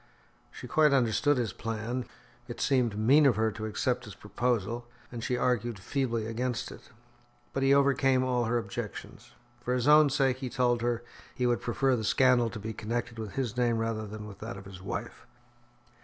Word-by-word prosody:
She -, -, -10 dB
quite 150 Hz, -2 st, +4 dB
understood 135 Hz, +3 st, +2 dB
his 115 Hz, -6 st, -1 dB
plan; 115 Hz, +3 st, -4 dB, 0.4 s
it 120 Hz, -, -7 dB
seemed 125 Hz, -6 st, +1 dB
mean 140 Hz, +7 st, +5 dB
of 125 Hz, -, +3 dB
her 110 Hz, +1 st, +1 dB
to 110 Hz, 0 st, -5 dB
accept 120 Hz, +3 st, -1 dB
his 105 Hz, -3 st, -10 dB
proposal, 120 Hz, +2 st, -2 dB, 0.2 s
and 120 Hz, -2 st, -6 dB
she 125 Hz, -, 0 dB
argued 120 Hz, -2 st, 0 dB
feebly 115 Hz, +2 st, -2 dB
against 120 Hz, +2 st, -3 dB
it. -, -, -13 dB, 0.6 s
But 135 Hz, -, -1 dB
he 135 Hz, 0 st, +3 dB
overcame 135 Hz, -2 st, +4 dB
all 125 Hz, -2 st, +1 dB
her 115 Hz, +2 st, +1 dB
objections. 120 Hz, -2 st, -6 dB, 0.3 s
For 125 Hz, +1 st, 0 dB
his 125 Hz, +1 st, 0 dB
own 150 Hz, 0 st, +7 dB
sake, 135 Hz, -2 st, +1 dB
he 130 Hz, -1 st, -5 dB
told 120 Hz, -2 st, +1 dB
her, 120 Hz, 0 st, -1 dB, 0.3 s
he 125 Hz, -, -1 dB
would 120 Hz, -1 st, +1 dB
prefer 130 Hz, +2 st, +1 dB
the 110 Hz, -, -3 dB
scandal 125 Hz, +1 st, +3 dB
to 115 Hz, -, -7 dB
be 110 Hz, +2 st, -5 dB
connected 115 Hz, +2 st, -4 dB
with 110 Hz, -3 st, -6 dB
his 125 Hz, -5 st, -2 dB
name 120 Hz, -2 st, +1 dB
rather 115 Hz, -1 st, -2 dB
than 105 Hz, +1 st, -8 dB
with 100 Hz, -2 st, -11 dB
that 110 Hz, -2 st, -6 dB
of 95 Hz, -, -11 dB
his 95 Hz, -1 st, -11 dB
wife. 95 Hz, -, -6 dB
120 Hz, 190 wpm, -29 LUFS, 110-130 Hz, 0.6 s, own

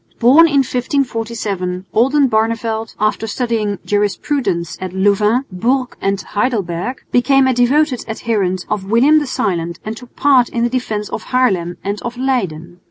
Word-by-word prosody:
Born 280 Hz, +8 st, +6 dB
in 280 Hz, -3 st, +3 dB
1547, 225 Hz, -8 st, -2 dB
Oldenbarneveldt, 230 Hz, -3 st, +1 dB
after 215 Hz, +1 st, 0 dB
studying 220 Hz, -3 st, -1 dB
Jurisprudence 205 Hz, -, -1 dB
at 185 Hz, -1 st, -5 dB
Louvain, 210 Hz, +6 st, +2 dB
Bourges 250 Hz, +8 st, -1 dB
and 195 Hz, 0 st, 0 dB
Heidelberg, 210 Hz, -1 st, -2 dB
became 270 Hz, +2 st, +4 dB
a 260 Hz, -, +2 dB
devoted 255 Hz, +2 st, +2 dB
adherent 205 Hz, -5 st, -1 dB
of 195 Hz, -2 st, -3 dB
William 270 Hz, +8 st, +5 dB
the 295 Hz, -, -4 dB
Silent 170 Hz, -8 st, -2 dB
and 215 Hz, +1 st, -4 dB
took 245 Hz, +1 st, -14 dB
part 265 Hz, -4 st, +4 dB
in 235 Hz, -, -2 dB
the 240 Hz, -, 0 dB
defence 220 Hz, -5 st, -2 dB
of -, -, -5 dB
Haarlem 190 Hz, -10 st, 0 dB
and 200 Hz, +1 st, -3 dB
of 240 Hz, +1 st, -5 dB
Leyden. 180 Hz, -10 st, -2 dB
225 Hz, 145 wpm, -17 LUFS, 195-255 Hz, -, Born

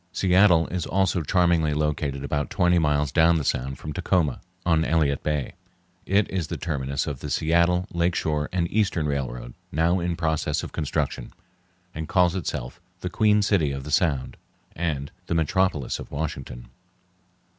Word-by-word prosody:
Seattle 90 Hz, -3 st, +4 dB
is 90 Hz, -2 st, -3 dB
also 95 Hz, -2 st, +1 dB
charmingly 85 Hz, -2 st, +2 dB
located 75 Hz, -2 st, -1 dB
about 75 Hz, 0 st, -2 dB
twenty 90 Hz, -2 st, +3 dB
miles 75 Hz, -3 st, +1 dB
down 85 Hz, +1 st, +4 dB
the 75 Hz, -, -1 dB
Sound 65 Hz, 0 st, -1 dB
from 75 Hz, +2 st, -6 dB
Tacoma, 85 Hz, -4 st, 0 dB, 0.2 s
on 80 Hz, -2 st, +3 dB
Elliott 75 Hz, -4 st, +1 dB
Bay. 75 Hz, -4 st, -2 dB, 0.5 s
It 100 Hz, +2 st, +3 dB
is 90 Hz, -5 st, -2 dB
the -, -, -4 dB
terminus 70 Hz, -4 st, -2 dB
of 70 Hz, -3 st, -4 dB
the -, -, -6 dB
Seattle, 85 Hz, +3 st, +2 dB
Lake 85 Hz, +1 st, +1 dB
Shore, 75 Hz, -1 st, -1 dB
and 85 Hz, -2 st, 0 dB
Eastern 100 Hz, -7 st, +1 dB
Railroad, 60 Hz, -4 st, -3 dB, 0.2 s
now 85 Hz, +4 st, +2 dB
in 85 Hz, 0 st, -1 dB
process 80 Hz, -2 st, -1 dB
of -, -, -6 dB
construction, 75 Hz, -3 st, -3 dB, 0.6 s
and 80 Hz, 0 st, -5 dB
calls 90 Hz, -2 st, +3 dB
itself 85 Hz, -4 st, -4 dB, 0.2 s
the 90 Hz, -, -4 dB
"Queen 105 Hz, -1 st, +3 dB
City 90 Hz, -8 st, +2 dB
of 70 Hz, -1 st, -5 dB
the 75 Hz, -, -7 dB
Sound" 75 Hz, -5 st, +1 dB, 0.4 s
and 75 Hz, -5 st, -2 dB, 0.2 s
the -, -, -1 dB
"Metropolis 80 Hz, -2 st, 0 dB
of -, -, -8 dB
Washington." 70 Hz, -5 st, -5 dB
80 Hz, 160 wpm, -25 LUFS, 75-90 Hz, 0.6 s, Seattle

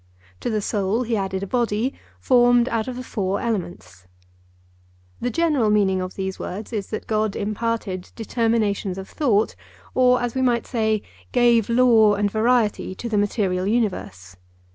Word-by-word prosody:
To -, -, -3 dB
the 215 Hz, -2 st, 0 dB
soul 205 Hz, +3 st, 0 dB
he 230 Hz, -1 st, -1 dB
added 195 Hz, -1 st, -2 dB
a -, -, -2 dB
body 235 Hz, +2 st, 0 dB, 0.3 s
formed 245 Hz, -, +4 dB
out 225 Hz, 0 st, -1 dB
of 255 Hz, -, -4 dB
the 255 Hz, -, -6 dB
four 200 Hz, -4 st, -2 dB
elements. 175 Hz, -, -5 dB, 1.1 s
The 245 Hz, -, -1 dB
general 300 Hz, -7 st, +1 dB
meaning 195 Hz, -3 st, +2 dB
of 185 Hz, 0 st, -5 dB
these 190 Hz, -1 st, -4 dB
words 210 Hz, +6 st, -6 dB
is 205 Hz, -3 st, -3 dB
that 215 Hz, -, -5 dB
God 215 Hz, -1 st, 0 dB
imparted 210 Hz, -3 st, -3 dB
determinations 220 Hz, -4 st, 0 dB
of 190 Hz, 0 st, -7 dB
thought, 225 Hz, -9 st, +1 dB, 0.4 s
or, 250 Hz, -1 st, +4 dB
as 245 Hz, -1 st, -2 dB
we 260 Hz, -, -1 dB
might 240 Hz, -3 st, +1 dB
say, 220 Hz, -4 st, 0 dB, 0.3 s
gave 235 Hz, -3 st, +3 dB
law 230 Hz, -3 st, +5 dB
and 205 Hz, 0 st, 0 dB
variety 220 Hz, -3 st, +1 dB
to 235 Hz, -, -6 dB
the 220 Hz, -2 st, 0 dB
material 195 Hz, -3 st, 0 dB
universe. 185 Hz, -, -2 dB
220 Hz, 160 wpm, -22 LUFS, 195-240 Hz, 1.1 s, law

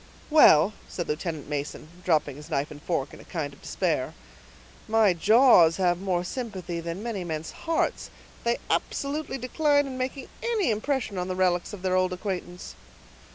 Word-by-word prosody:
"Well," 205 Hz, -, +7 dB, 0.2 s
said 175 Hz, -, -4 dB
Lieutenant 155 Hz, 0 st, -3 dB
Mason, 145 Hz, +1 st, -4 dB, 0.2 s
dropping 155 Hz, -5 st, +1 dB
his 150 Hz, +2 st, -11 dB
knife 145 Hz, -2 st, -1 dB
and 145 Hz, -1 st, -10 dB
fork 160 Hz, -6 st, -2 dB
in -, -, -11 dB
a -, -, -12 dB
kind 150 Hz, -5 st, -4 dB
of -, -, -18 dB
despair, -, -, -1 dB, 0.7 s
"my 220 Hz, -3 st, +4 dB
jaws 200 Hz, -3 st, +6 dB
have 175 Hz, -1 st, +1 dB
more 180 Hz, -3 st, 0 dB
sympathy 185 Hz, -6 st, -5 dB
than 170 Hz, +4 st, -5 dB
many 225 Hz, -6 st, -3 dB
men's 160 Hz, -2 st, -4 dB
hearts. 330 Hz, -1 st, -1 dB, 0.3 s
They 235 Hz, 0 st, +1 dB
absolutely 285 Hz, 0 st, -2 dB
decline 280 Hz, +1 st, +1 dB
making 260 Hz, +1 st, -4 dB
any 445 Hz, -, +1 dB
impression 220 Hz, -2 st, -1 dB
on 180 Hz, -, -2 dB
the 185 Hz, -, -3 dB
relics 180 Hz, -1 st, +1 dB
of 200 Hz, -3 st, -9 dB
their 185 Hz, -1 st, +1 dB
old 185 Hz, 0 st, +2 dB
acquaintance." 180 Hz, -2 st, -5 dB
185 Hz, 160 wpm, -26 LUFS, 165-240 Hz, 0.7 s, Well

